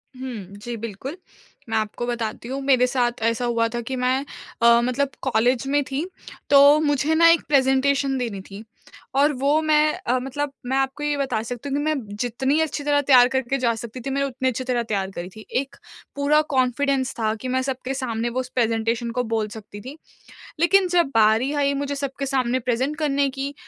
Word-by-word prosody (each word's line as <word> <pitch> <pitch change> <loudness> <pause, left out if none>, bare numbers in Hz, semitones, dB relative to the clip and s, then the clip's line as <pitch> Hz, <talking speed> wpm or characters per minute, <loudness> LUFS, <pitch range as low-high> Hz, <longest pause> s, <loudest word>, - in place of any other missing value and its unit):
हुँ। 230 -7 -7
जी 240 0 -4
बिल्कुल, 230 - -6 0.5
मैं 225 - 0
आपको 215 +2 -2
बताती 235 -1 -4
हूँ 270 +2 -4
मेरे 255 -2 +4
साथ 245 -2 -1
ऐसा 230 +2 +1
हुआ 230 -1 +1
था 235 +1 -4
कि 260 +3 -4
मैं 255 0 +1 0.5
अ, 235 0 +6
मतलब 255 +3 0
कॉलेज 250 +1 +1
में 285 +1 +2
थी, 275 +5 -3 0.4
तो 285 +1 +7
मुझे 295 +1 +1
ना 335 +1 +6
एक 335 0 +5
प्रेजेंटेशन 270 0 +2
देनी 225 -6 -3
थी 200 +2 -9 0.5
और 290 +2 +4
वो 285 +4 +1
मैं 305 -1 +3
अ, 250 +2 +2
मतलब 270 +3 -3
मैं 265 +2 0
आपको 270 +2 -1
ये 295 -1 0
बता 255 -6 -1
सकती 245 +4 -6
हूँ 280 - -1
कि 290 - -1
मैं 310 0 +1 0.2
जितनी 265 +6 0
अच्छी 295 -2 -2
तरह 290 0 +2
तैयार 255 -3 +6
करके 265 0 -1
जा 240 -3 +1
सकती 235 +2 -8
थी 270 - -5
मैं 275 +1 0
उतनी 260 -1 -1
अच्छी 255 +1 -3
तरह 245 -2 -1
तैयार 195 -3 -2
करी 175 0 -6
थी, 215 +3 -13
एक 270 +1 -2 0.4
पूरा 290 +2 +3
कॉन्फिडेंस 260 +1 +1
था 220 -1 +1
कि 260 - -4
मैं 260 +1 0
सबके 260 0 -3
सामने 240 -3 -2
वो 250 +2 -3
उस 255 0 -4
प्रेजेंटेशन 230 0 0
को 250 +1 -1
बोल 225 -2 -1
सकती 205 -1 -10
थी। 270 +6 -9 0.6
लेकिन 370 +2 +4
जब 350 -2 +3
बारी 225 +5 +3
आई 280 - +2
मुझे 285 0 -2
सबके 275 0 -4
सामने 260 -2 0
प्रेजेंट 255 +5 -1
करने 285 -2 +1
की, 275 +1 -5
260 Hz, 200 wpm, -23 LUFS, 235-280 Hz, 0.6 s, तो